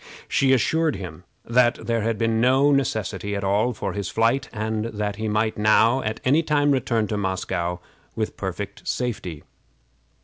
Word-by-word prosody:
She 135 -1 +2
assured 160 +5 +2
him 90 -2 -8 0.2
that 120 0 +3
there 115 -1 0
had 115 0 -1
been 115 0 +1
no 135 +4 +4
necessity 110 -6 -1
at 100 - -3
all 105 +5 +2
for 100 -4 -4
his 100 -2 -3
flight, 115 +6 +1
and 110 0 -2
that 105 -2 -3
he 110 0 -3
might 110 +1 0
now 110 +4 +4
at 110 -2 -3
any 145 +6 +4
time 145 -2 +2
return 120 -5 +1
to 105 - -1
Moscow 95 -3 -2 0.4
with 110 -1 -2
perfect 100 +1 -6
safety. 105 - -3
110 Hz, 165 wpm, -23 LUFS, 100-125 Hz, 0.4 s, no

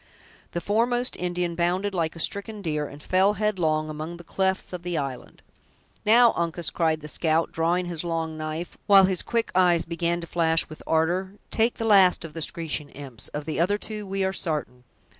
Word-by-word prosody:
The 170 - -2
foremost 240 +6 +1
Indian 175 -1 -2
bounded 180 +4 0
like 165 -3 -1
a - - -9
stricken 200 +4 -2
deer, 150 -3 -1
and 145 +1 -12
fell 190 +2 +3
headlong 175 -7 0
among 155 +3 -6
the 175 - -12
clefts 190 +2 -1
of 180 - -4
the 175 -1 -3
island. 135 -4 -5 0.6
"Now, 235 +2 +7
Uncas!" 170 0 -1
cried 160 -2 +1
the 150 - -8
scout, 160 +1 +1
drawing 170 +2 +1
his 175 -2 -4
long 165 -2 -2
knife, 155 +2 -5
while 195 -1 +8
his 185 -1 +2
quick 230 -1 -1
eyes 175 -2 +4
began 170 0 -1
to 170 - -6
flash 165 -1 +1
with 155 - -11
ardor, 175 +4 +1 0.2
"take 230 +2 +2
the 225 - -3
last 195 -5 +5
of 155 - -9
the 165 - -6
screeching 155 -2 -3
imps; 135 -5 -7
of 150 0 -6
the 160 - -3
other 190 +5 +2
two 210 -1 -6
we 195 0 -1
are 190 0 0
sartain!" 150 -9 -3
170 Hz, 195 wpm, -25 LUFS, 160-190 Hz, 0.6 s, while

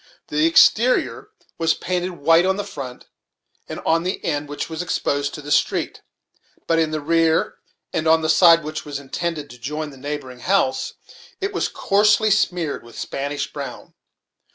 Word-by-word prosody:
The 150 +2 +2
exterior 245 - +3 0.3
was 165 -1 +2
painted 180 0 -2
white 165 +1 +4
on 190 +1 +2
the 205 - -3
front 130 -7 -8 0.6
and - - -5
on 165 +1 +3
the 180 +2 -4
end 145 -2 -2
which 145 - -4
was 160 0 -5
exposed 145 -5 -1
to 150 - -9
the 145 - -7
street; - - +1 0.6
but 165 0 +2
in 160 -1 +2
the 155 0 -2
rear, 165 +1 +1 0.4
and 160 - -1
on 160 0 +4
the - - +1
side 165 0 +6
which 155 +1 -5
was 145 -2 -5
intended 150 +2 -4
to 125 - -13
join 150 +5 -4
the 135 - -14
neighboring 130 -2 -6
house, 135 -4 0 0.5
it 395 +1 -3
was - - 0
coarsely 210 +2 +3
smeared 175 -7 0
with 115 0 -14
Spanish 140 +1 -4
brown. - - -7
160 Hz, 170 wpm, -21 LUFS, 145-175 Hz, 0.6 s, side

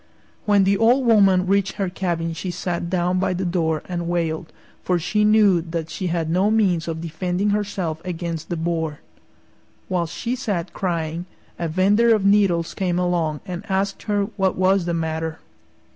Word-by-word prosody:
When 205 -2 +5
the 195 +1 +3
Old 245 +5 +3
Woman 195 -5 +5
reached 195 0 +1
her 195 -2 -2
cabin 170 -3 -2
she 180 +3 -5
sat 175 -1 -3
down 180 0 +1
by 185 0 +1
the 185 +1 -2
door 165 -3 0
and 175 -2 -3
wailed, 165 -1 -2 0.3
for 180 - +1
she 210 +5 0
knew 210 -4 +5
that 165 -1 -5
she 185 - -3
had 165 -2 -1
no 185 +5 +2
means 190 -7 +2
of 160 -1 -3
defending 180 +5 -1
herself 195 -6 -2
against 170 -3 -4
the 175 - -2
Boar. 160 -2 -2 0.9
While 175 -2 0
she 175 +9 -3
sat 205 -10 -3
crying 170 -1 -2 0.3
a 170 - -1
vender 205 +7 +4
of 200 -2 -1
needles 195 -5 +3
came 180 -2 -1
along 170 -4 0
and 180 -2 -5
asked 195 +1 -1
her 205 -1 +2
what 190 -1 +1
was 185 0 +2
the 170 -1 -1
matter. 160 0 -2
180 Hz, 175 wpm, -22 LUFS, 165-195 Hz, 0.9 s, When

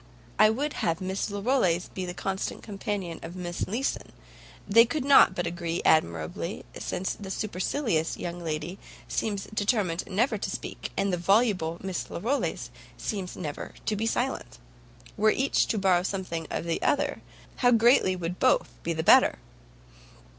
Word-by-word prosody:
I 215 0 +8
would 285 +7 -1
have 165 0 0
Miss 190 +2 -2
Larolles 200 -4 +1
be 185 -1 -4
the 175 - -5
constant 195 0 -3
companion 195 -4 -4
of 170 +2 -8
Miss 175 -1 -4
Leeson: 240 +8 -2 0.5
they 230 +3 +7
could 255 +4 -2
not 275 -9 +7
but 175 - -1
agree 170 0 -3
admirably, 85 - +1
since 190 - -2
that 195 -2 -9
SUPERCILIOUS 190 - -1
young 175 0 -5
lady 160 +3 -4 0.3
seems 205 -3 -2
determined 205 -5 0
never 220 +8 +1
to - - -3
speak, - - -6
and 195 -1 +1
the - - +1
VOLUBLE 185 -3 +2
Miss 190 -2 -3
Larolles 250 +10 -2 0.6
never 150 -4 -6
to 215 - 0
be 220 +2 -1
silent. 240 - -2 0.6
Were 215 +1 +4
each 270 +5 +2
to 225 - 0
borrow 190 -3 +3
something 180 -4 -3
of - - -3
the 165 -1 -1
other, 285 - +1 0.4
how 245 - +4
greatly 230 -5 +5
would 180 0 -4
both - - +3
be 170 - -1
the 160 0 -2
better!" - - +6
190 Hz, 155 wpm, -27 LUFS, 170-220 Hz, 0.6 s, I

